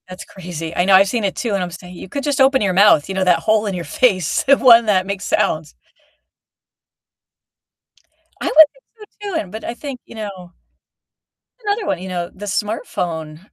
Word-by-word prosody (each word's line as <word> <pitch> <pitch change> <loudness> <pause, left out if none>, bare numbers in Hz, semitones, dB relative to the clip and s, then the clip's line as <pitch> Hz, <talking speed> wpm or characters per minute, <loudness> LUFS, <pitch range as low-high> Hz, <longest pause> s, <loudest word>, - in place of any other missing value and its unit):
That's 185 +1 -9
crazy, 165 -4 -8
I 175 - +1
know, 195 - +3
I've 195 +1 +6
seen 230 +2 -2
it 195 -2 -1
too, 230 -4 -3
and 195 - 0
I - - -1
would 175 - -9
say, 180 - -13
"You 180 +1 -10
could 280 +6 -4
just 285 -2 0
open 265 0 +4
your 200 -3 +1
mouth, 190 -6 +5
you 195 - -5
know? 190 - 0
That 180 -2 +3
hole 215 0 +1
in 200 - -2
your 175 -2 -5
face, 190 - +1
the 275 0 +4
one 235 -3 +6
that 190 -3 +2
makes 200 0 -5
sounds." 155 -1 -1 2.7
I - - -5
would - - -2 0.2
think - - -27 0.4
so 410 - -5
too, 380 - -4
and 185 - -7
but 220 +2 -8
I - - -4
think, 270 0 -8
you - - -14
know 195 -5 -8 1.1
another 410 +1 -1
one, - - -1
you 190 - -7
know, 175 -2 -4
the 205 +2 -9
smartphone, 175 -7 -4
195 Hz, 210 wpm, -19 LUFS, 180-230 Hz, 2.7 s, I've